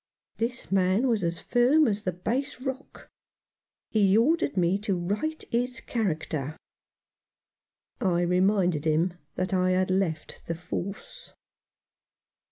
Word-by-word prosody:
This 235 0 -3
man 195 +6 +3
was 225 -6 +1
as 170 0 0
firm 260 +6 +3
as 210 -1 0
the 185 - -1
Bass 245 - -2
Rock. 265 +1 -6 0.8
He 205 -2 +4
ordered 285 - +2
me 180 +2 +2
to 205 -2 -1
right 210 - -2
his 245 +2 0
character. 160 - -2 1.4
I 175 -3 +1
reminded 180 -3 +2
him 165 +3 +2 0.2
that 185 +1 -2
I 185 0 +2
had 185 0 +1
left 180 -5 -1
the 165 - -2
Force. 180 +3 -6
195 Hz, 120 wpm, -27 LUFS, 175-235 Hz, 1.4 s, He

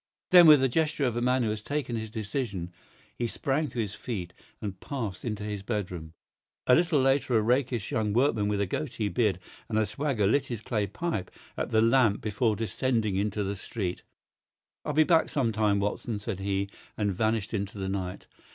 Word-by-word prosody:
Then, 175 -2 +9
with 150 -3 +9
the 135 - +4
gesture 150 +1 +1
of 120 -3 0
a 120 - -1
man 125 +1 +2
who 110 - +1
has 105 0 -4
taken 140 -1 -2
his 110 -1 -4
decision, 105 -5 -3 0.5
he 120 - +1
sprang 140 +6 -1
to 125 - -10
his 105 -4 -1
feet 95 -9 -5 0.3
and 100 -3 -5
passed 115 -10 -5
into 105 -3 -3
his 105 -1 -4
bedroom. 90 -7 -4 0.5
A 125 - +5
little 165 0 +4
later 135 -2 +3
a - - +3
rakish 125 -1 0
young 110 -5 0
workman 115 -3 +2
with 105 -1 0
a 100 - +2
goatee 110 0 -2
beard 105 -7 +1 0.3
and 110 - 0
a 110 - +3
swagger 110 0 -1
lit 135 +7 +2
his 120 -5 -4
clay 105 -4 -1
pipe 105 - -3 0.3
at - - -2
the 110 - +3
lamp 115 -2 +4
before 110 +1 0
descending 115 -1 0
into 105 +1 0
the 100 +1 -2
street. 95 -2 -4 0.8
"I'll 150 - -2
be 155 +2 +5
back 165 0 +3
some 130 -6 +1
time, 105 -2 +2
Watson," 105 +2 -2
said 105 -2 -4
he, 100 0 -1 0.3
and 105 -2 0
vanished 110 +2 0
into 100 -1 -3
the 95 -1 -3
night. 95 -2 -4
110 Hz, 195 wpm, -28 LUFS, 100-130 Hz, 0.8 s, Then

